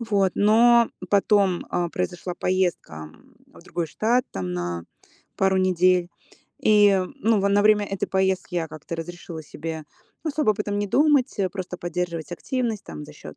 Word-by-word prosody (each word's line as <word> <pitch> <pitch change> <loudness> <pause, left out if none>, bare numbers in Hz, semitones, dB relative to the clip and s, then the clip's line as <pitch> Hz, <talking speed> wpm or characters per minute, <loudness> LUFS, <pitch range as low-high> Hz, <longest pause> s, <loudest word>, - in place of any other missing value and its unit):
Вот. 200 -5 +1
Но 235 +3 +5 0.2
потом, 200 -2 +2
э, 175 -1 0
произошла 180 0 -3
поездка, 175 - -2
м, - - -23 0.2
в - - -16
другой 170 -1 -3
штат, 235 +9 +1
там 90 -1 -4
на 85 -1 -3 0.5
пару 190 0 +2
недель. 185 -1 +3 0.5
И, 205 -2 +5 0.2
ну, 225 -5 +2
в 200 - +2
на 200 +1 +3
время 210 0 +4
этой 195 -1 -3
поездки 190 -1 0
я 165 -2 0
как-то 155 +2 -7
разрешила 170 0 -7
себе 160 +1 -6 0.4
особо 300 -6 +1
об 210 - -2
этом 205 -1 -2
не 205 - -1
думать, 285 +2 +3
э, 195 -2 +1
просто 185 -1 -6
поддерживать 175 -1 -4
активность 235 +2 -2
там 75 -2 -8
за - - -12
счёт, - - -11
190 Hz, 165 wpm, -24 LUFS, 170-210 Hz, 0.5 s, Но